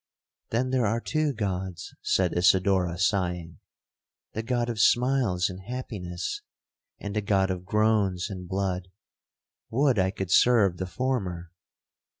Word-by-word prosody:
'—'Then 125 +3 0
there 125 -4 +2
are 115 +3 0
two 155 +4 0
Gods,' 95 -6 -4
said 90 -3 +1
Isidora 90 -1 +3
sighing, 90 -5 -1 0.7
'the 110 - -2
God 120 0 -1
of 115 -3 -3
smiles 120 -9 +3
and 90 -1 -7
happiness, 105 - -5 0.6
and 100 0 -5
the 105 - +1
God 100 -2 +1
of 90 -1 -5
groans 105 -3 +1
and 95 -4 -7
blood. 95 -1 -2 0.8
Would 130 -2 +2
I 95 0 +3
could 95 -2 -5
serve 105 -7 +5
the 95 - -3
former!' 90 -7 -2
100 Hz, 135 wpm, -27 LUFS, 90-115 Hz, 0.8 s, serve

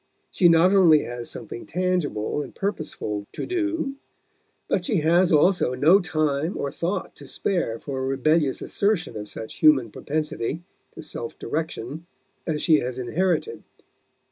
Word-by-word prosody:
She 175 - +4
not 170 +3 +5
only 170 -6 +6
has 120 -1 -6
something 115 0 -8
tangible 170 - -1
and - - -9
purposeful 150 - -3
to - - -4
do, 325 -6 -2 0.7
but - - 0
she 210 - 0
has 170 +3 +4
also 155 -4 +3
no 160 +9 +5
time 155 -1 -1
or 140 - -2
thought 170 +7 -3
to - - -12
spare 170 - -1
for 135 +2 -5
a 130 - -2
rebellious 140 +2 +1
assertion 200 - 0
of 105 -1 -6
such 110 - -8
human 135 -8 +5
propensity 155 +1 -3 0.3
to - - -8
self 120 -6 -7
direction 155 +1 -4 0.4
as 155 -2 -1
she 155 -3 +5
has 125 0 -4
inherited. 180 - -1
155 Hz, 145 wpm, -24 LUFS, 130-180 Hz, 0.7 s, only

